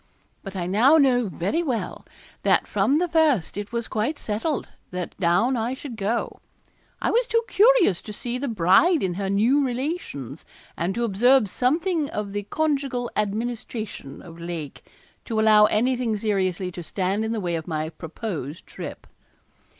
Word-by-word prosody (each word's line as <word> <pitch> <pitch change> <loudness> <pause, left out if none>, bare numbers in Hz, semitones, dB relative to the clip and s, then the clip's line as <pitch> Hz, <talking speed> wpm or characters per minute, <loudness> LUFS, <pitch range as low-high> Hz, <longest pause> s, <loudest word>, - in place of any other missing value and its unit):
But 195 -1 -8
I 180 -2 -2
now 230 - +5
know 250 -5 +3
very 185 - -1
well 255 -9 -3 0.3
that - - +3
from 210 +8 +2
the 355 +2 +1
first 315 - +2
it 205 +1 -5
was 235 -1 -3
quite 225 +8 -1
settled 230 +8 -2 0.2
that 180 -1 -5
down 195 +9 +3
I 235 +2 -1
should 265 -3 -8
go. 220 +3 -2 0.6
I - - 0
was 480 +1 +2
too 460 -1 +2
curious 420 - +4
to 215 - -8
see 240 +4 -4
the 280 - -2
bride 225 - +4
in 185 -2 0
her 195 +2 -3
new 235 +9 +3
relations, 250 - -4 0.3
and 175 +3 -2
to 235 - -1
observe 235 +3 +4
something 305 - 0
of 210 -1 -4
the 205 - -1
conjugal 275 -6 -1
administration 215 - -4
of 170 -1 -12
Lake, 170 -4 -6 0.4
to 225 -2 -1
allow 215 -1 +6
anything 240 0 +1
seriously 190 -3 -1
to 175 - -7
stand 190 +4 -1
in 220 - -2
the 225 - -1
way 175 -3 -2
of 160 -1 -5
my 155 -2 -2
proposed 160 - -6
trip. - - -8
220 Hz, 165 wpm, -24 LUFS, 185-265 Hz, 0.6 s, allow